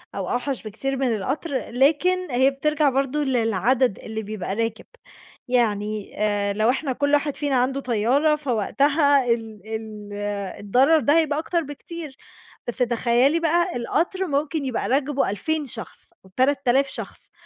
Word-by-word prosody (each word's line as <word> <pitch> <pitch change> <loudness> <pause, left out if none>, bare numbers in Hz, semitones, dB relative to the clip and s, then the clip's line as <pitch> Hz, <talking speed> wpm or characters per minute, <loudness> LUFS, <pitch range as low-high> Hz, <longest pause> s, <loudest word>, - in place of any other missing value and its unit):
أو 190 -2 -3
أوحَش 250 +1 -2
بكتير 270 +6 -3
من 250 -4 +1
القطر، 260 - -3
لكن 320 +7 +2
هي 260 +3 +4
بترجَع 300 +1 +1
برضه 275 +2 0
للعدد 240 -1 +1
اللي 220 0 -5
بيبقى 200 -2 -4
راكب، 225 -1 -2 0.6
يعني 215 -4 0
آآ 205 -1 +1
لو 215 +3 +2
إحنا 265 +1 0
كلّ 285 +2 0
واحد 290 -1 +2
فينا 285 -2 -1
عنده 260 +2 +1
طيارة 255 +6 +2
فوقتها 280 +2 +2
ال 225 -3 -2
ال 215 -2 -8 0.5
الضرر 260 +10 +4
ده 290 +3 +3
هيبقى 300 -2 0
أكتر 335 +1 0
بكتير، 295 0 -8 0.5
بس 240 - -4
تخيّلي 245 +5 +2
بقى 345 +2 +1
القطر 355 +9 -1
ممكن 290 +1 -1
يبقى 255 -3 -2
راكبه 275 -1 +1
2.000 300 +10 -2
شخص 225 -8 -10 0.2
أو 190 - -18
3.000 270 0 +3
شخص، - - -9
265 Hz, 145 wpm, -23 LUFS, 225-290 Hz, 0.6 s, هي